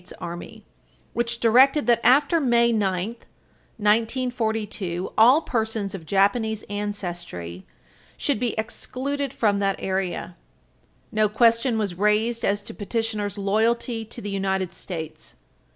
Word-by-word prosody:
S. 180 - -11
Army, 170 0 -8 0.5
which 235 0 -1
directed 265 +6 +5
that, 235 -2 +4
after 285 +7 +5
May 235 -4 +3
9, 195 -3 0 0.7
1942, 220 -4 -1
all 250 +8 +6
persons 220 -6 -2
of 170 -5 -8
Japanese 210 +4 +1
ancestry 175 - -5 0.5
should 285 -7 0
be 240 -2 -1
excluded 270 +5 -3
from 205 -3 +1
that 195 -1 +1
area. 185 -2 -3 0.8
No 215 -1 +2
question 230 +2 +3
was 205 -4 -1
raised 210 +5 +1
as 205 +1 +1
to - - -9
petitioner's 210 -1 -3
loyalty 225 +3 0
to 235 +2 -9
the 205 - -5
United 190 -2 -1
States. 160 -3 -7
215 Hz, 120 wpm, -24 LUFS, 195-235 Hz, 0.8 s, all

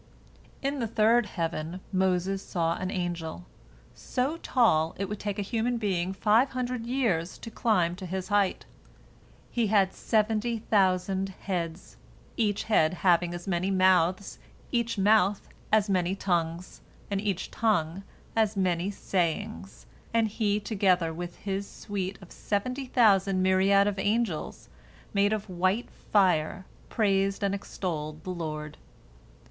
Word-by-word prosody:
In 275 +1 -1
the 230 - -1
third 225 +1 +3
heaven 165 -1 -3
Moses 190 +1 +1
saw 165 -3 0
an 185 - -3
angel, 175 -2 -4 0.5
so 270 +6 -2
tall 165 - +2
it 195 - -2
would 210 +1 -5
take 205 0 -3
a 205 - -1
human 235 +4 -1
being 190 -5 -1
five 220 +6 +3
hundred 250 -2 -3
years 215 -10 0
to 230 - -9
climb 180 -7 +1
to 185 -1 -7
his 185 +2 -4
height. 205 -2 +1 0.9
He 235 -3 +1
had 195 -2 +3
seventy 220 +1 0
thousand 195 -2 +1
heads, 170 -2 -4 0.4
each 210 -3 0
head 180 -6 +3
having 175 -1 +4
as 175 +1 -8
many 185 0 0
mouths, 185 0 +2 0.3
each 235 -2 0
mouth 205 0 +3 0.2
as 215 -1 +4
many 185 -1 +1
tongues, 175 -2 -2 0.3
and 200 -1 0
each 200 -3 -2
tongue 190 -6 0 0.3
as 220 -2 +2
many 180 -1 +1
sayings, 160 - -3 0.3
and 225 -1 +4
he 210 -1 0
together 185 -6 +1
with 175 +1 -6
his 195 0 -3
suite 195 -2 -4
of 180 - -15
seventy 255 +6 -2
thousand 195 -6 +3
myriads 195 +2 +4
of 200 -2 -1
angels 205 -5 -1 0.5
made 200 0 +3
of 215 -1 -2
white 185 +5 0
fire 185 -3 +1 0.2
praised 195 -1 +1
and 200 0 +1
extolled 155 -6 -4
the 185 - -4
Lord. 155 -3 -5
195 Hz, 135 wpm, -28 LUFS, 175-215 Hz, 0.9 s, having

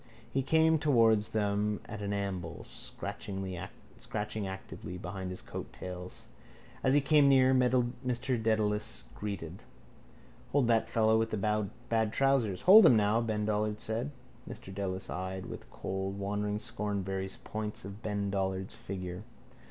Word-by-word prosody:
He 135 - +2
came 160 +3 +4
towards 115 -7 +4
them 105 0 0
at 105 -1 -7
an 100 0 -2
amble, 95 -4 -3
scratching 95 - -7 1.1
actively 95 -2 -7
behind 95 0 -5
his 90 - -7
coattails. 90 0 -7 0.6
As 130 +1 +4
he 145 - +5
came 145 0 +5
near 130 -1 +6
Mr 125 -1 +1
Dedalus 110 0 0
greeted: 95 -4 -5 0.9
—Hold 140 -3 +4
that 115 -1 +3
fellow 110 -1 +4
with 115 0 +1
the 110 - -2 0.5
bad 110 -2 +1
trousers. 135 -9 +2
—Hold 210 +5 +9
him 120 - +7
now, 105 +2 +3
Ben 110 -2 -1
Dollard 105 0 0
said. 115 +6 -2 0.4
Mr 95 - -8
Dedalus 95 -1 -3
eyed 95 0 -4
with - - -8
cold 95 +1 -4
wandering 105 +1 -1
scorn 105 -3 -3
various 95 0 -3
points 105 -2 -5
of 100 +2 -8
Ben 100 -2 -2
Dollard's 95 0 -1
figure. 95 -5 -6
105 Hz, 135 wpm, -31 LUFS, 95-115 Hz, 1.1 s, Hold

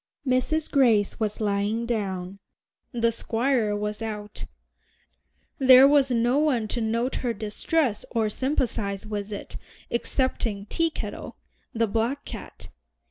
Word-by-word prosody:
Mrs. 265 +5 0
Grace 230 -8 +3
was 215 -2 -2
lying 210 +2 0
down, 195 -5 -3 0.5
the 230 -2 +1
Squire 230 -1 0
was 210 +1 -3
out; 210 -2 -5 1.1
there 260 0 +8
was 280 -2 +4
no 240 +3 +2
one 260 -8 +1
to 240 - -2
note 230 +4 -1
her 240 -2 -2
distress 220 +4 -1
or 225 -2 0
sympathize 220 -5 -2
with 210 -1 -4
it 205 - -6 0.3
excepting 235 -4 -1
Teakettle, 330 +7 -3 0.4
the 230 -3 +1
black 230 +6 -1
cat. - - -9
230 Hz, 120 wpm, -25 LUFS, 210-260 Hz, 1.1 s, there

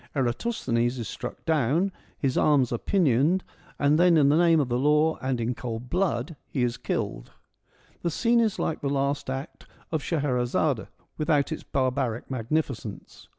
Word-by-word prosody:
Eratosthenes 120 - 0
is 115 -4 -4
struck 125 +3 -7
dow 145 -6 +2
T 175 - +3
n, 195 - -1 0.3
his 135 -2 0
arms 140 -5 +3
are 120 - -1
pinioned, 165 - +2 0.3
and 145 +2 +3
then 175 -1 +5
in 140 -2 +5
the 145 - +4
name 165 -1 +5
of 140 - +1
the 120 +1 0
law 150 +3 +3
and 130 -2 -1
in 115 +2 -1
cold 120 0 -6
blood 165 -6 0
he 130 - -1
is 120 -1 0
killed. - - -4 0.7
The 170 - 0
scene 235 +8 +2
is 220 -3 +1
like 160 - -2
the 140 - -1
last 140 0 -1
act 135 +3 -6 0.2
of 160 -2 0
Scheherazade 130 - 0 0.3
without 150 -1 +2
its 160 - -3
barbaric 130 -3 -1
magnificence. 125 -4 -3
140 Hz, 170 wpm, -26 LUFS, 125-160 Hz, 0.7 s, then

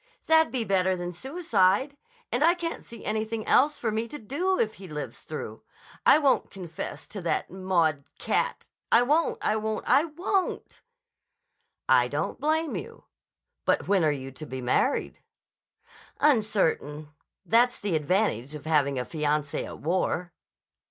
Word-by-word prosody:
"That'd 320 0 +4
be 255 -3 0
better 190 -1 +2
than 175 0 -4
suicide. 260 - +1 0.4
And 245 +5 +1
I 340 +2 +5
can't 335 -1 -4
see 230 -2 -11
anything 220 +1 -2
else 295 +3 +4
for 225 - -1
me 220 +2 -2
to 295 - -7
do 330 - -1
if 220 -1 +1
he 190 - -8
lives 150 -2 -6
through. - - -7 0.5
I - - +8
won't 280 -4 +2
confess 175 -4 -7
to 205 - -6
that 170 - -1
Maud 170 -6 0
cat! - - -1 0.2
I 235 - +6
won't! 300 +6 +2
I 215 - +2
won't! 220 0 -3
I 295 - +5
won't!" 360 +4 -2 1.1
"I - - +5
don't - - -3
blame 315 +1 0
you. - - -7 0.6
But - - +1
when 195 -3 +3
are 155 - +4
you 135 -2 -5
to 135 +4 -9
be 130 - -5
married?" 130 - 0 1.0
"Uncertain. 190 - +1 0.3
That's 245 +2 +3
the 200 -5 -1
advantage 155 - 0
of 150 0 -9
having 145 -4 +2
a 125 - -2
fiancé 150 -1 -1
at - - -8
war." 175 +1 -1
205 Hz, 150 wpm, -27 LUFS, -, 1.1 s, I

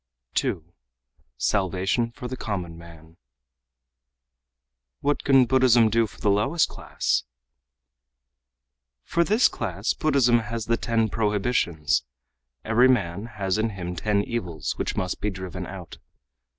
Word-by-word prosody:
2. 85 -1 -2 0.6
Salvation 95 - 0
for 125 +1 -8
the 130 - -5
Common 90 -8 -4
Man 85 -1 -14 1.8
"What 145 +1 0
can 135 -2 +5
Buddhism 120 -3 +4
do 115 0 +3
for - - -17
the 105 - +2
lowest 120 +12 +2
class?" - - -1 1.8
"For 170 - +1
this 215 +8 +4
class 100 -2 -2
Buddhism 130 -6 +3
has 115 0 -4
the 115 - +2
ten 115 -1 +1
prohibitions. 100 - 0 0.6
Every 115 +3 +5
man 105 -4 0
has 95 0 0
in 110 +1 +1
him 90 -1 -4
ten 100 +3 +1
evils, 95 -9 -3
which - - -3
must 90 -1 -2
be 105 - 0
driven 95 -3 -6
out. - - -9
105 Hz, 125 wpm, -25 LUFS, 90-120 Hz, 1.8 s, can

